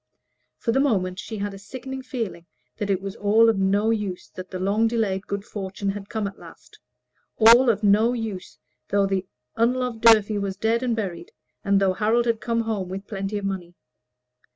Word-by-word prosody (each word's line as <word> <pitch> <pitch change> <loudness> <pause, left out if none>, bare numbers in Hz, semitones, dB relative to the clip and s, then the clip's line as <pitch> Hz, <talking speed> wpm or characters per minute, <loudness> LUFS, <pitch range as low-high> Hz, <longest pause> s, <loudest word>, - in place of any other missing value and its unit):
For 230 - -1
the 265 - +2
moment 190 -9 +1
she 220 - -6
had 205 0 -3
a 195 - -9
sickening 265 +5 -7
feeling 225 -10 -5 0.3
that 205 -2 -3
it 190 -1 0
was 195 0 -5
of 220 +1 +4
no 200 +3 +2
use 205 -5 -3
that 185 0 -9
the 185 - -5
long 200 +5 +1
delayed 210 -5 -1
good 200 0 -4
fortune 200 0 -4
had 200 0 -8
come 220 -2 -2
at 200 0 -6
last - - -15 0.6
all 235 +3 +7
of 220 -1 +1
no 210 +3 +4
use 220 -6 -5 0.3
though 200 -1 +3
the 195 -1 -1 0.3
unloved 245 0 0
Durfey 215 -2 +5
was 195 -1 -3
dead 225 +3 +1
and 245 -3 0
buried, 215 - -5 0.3
and 200 -1 +3
though 195 -1 +2
Harold 225 +4 +1
had 230 -2 0
come 230 -1 0
home 215 -5 -3
with 195 +2 -6
plenty 195 -1 -4
of 200 - -4
money. 180 -3 -4
205 Hz, 190 wpm, -24 LUFS, 195-230 Hz, 0.6 s, all